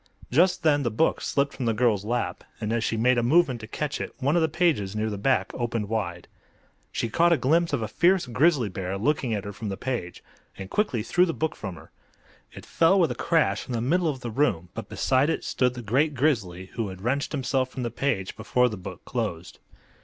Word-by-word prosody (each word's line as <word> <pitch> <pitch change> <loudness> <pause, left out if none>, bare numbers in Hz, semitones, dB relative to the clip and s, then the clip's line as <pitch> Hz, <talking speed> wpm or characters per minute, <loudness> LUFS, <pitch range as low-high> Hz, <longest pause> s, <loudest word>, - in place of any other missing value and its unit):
Just 175 +8 +3
then 145 -2 +4
the 120 - 0
book 115 +9 +1
slipped 140 0 0
from 130 - -4
the 115 - +1
girl's 110 -4 +2
lap, 120 +3 -2 0.2
and 110 0 -2
as 115 -1 0
she 115 - -1
made 125 +2 +3
a - - +2
movement 130 -1 +3
to 110 - -8
catch 145 +5 -3
it - - -6
one 140 +3 +1
of 170 - +3
the 160 - +2
pages 145 - +1
near 110 0 -1
the - - -3
back 130 +5 +1
opened 115 -4 -2
wide. 90 -6 -3 0.6
She - - -1
caught 170 +10 +3
a 170 - +5
glimpse 165 +6 +2
of 135 -6 0
a - - -2
fierce 180 - +3
grizzly 135 0 +2
bear 95 0 -4
looking 125 0 0
at 100 - -3
her 100 - -6
from 105 +1 -5
the 95 - -4
page, 120 -10 -4 0.3
and 95 0 -8
quickly 130 - 0
threw 180 +10 +3
the 165 - -2
book 160 0 -2
from 95 -4 -6
her. - - -15 0.6
It - - -11
fell 170 +4 +3
with 170 - +3
a - - 0
crash 165 -2 +1
in 125 - -4
the 115 - 0
middle 165 +9 +1
of 135 -4 -2
the 120 -2 -5
room, 100 - 0
but - - -7
beside 130 +4 +2
it 160 - -1
stood 125 -1 0
the 120 - -7
great 140 +8 +1
grizzly, 100 - 0
who 115 -3 -2
had 95 0 -9
wrenched 140 +5 0
himself 130 -2 0
from 130 - -5
the 120 - -2
page 115 -10 -2
before 125 +3 +2
the 105 - -6
book 90 - -9
closed. - - -4
125 Hz, 235 wpm, -26 LUFS, 110-150 Hz, 0.6 s, a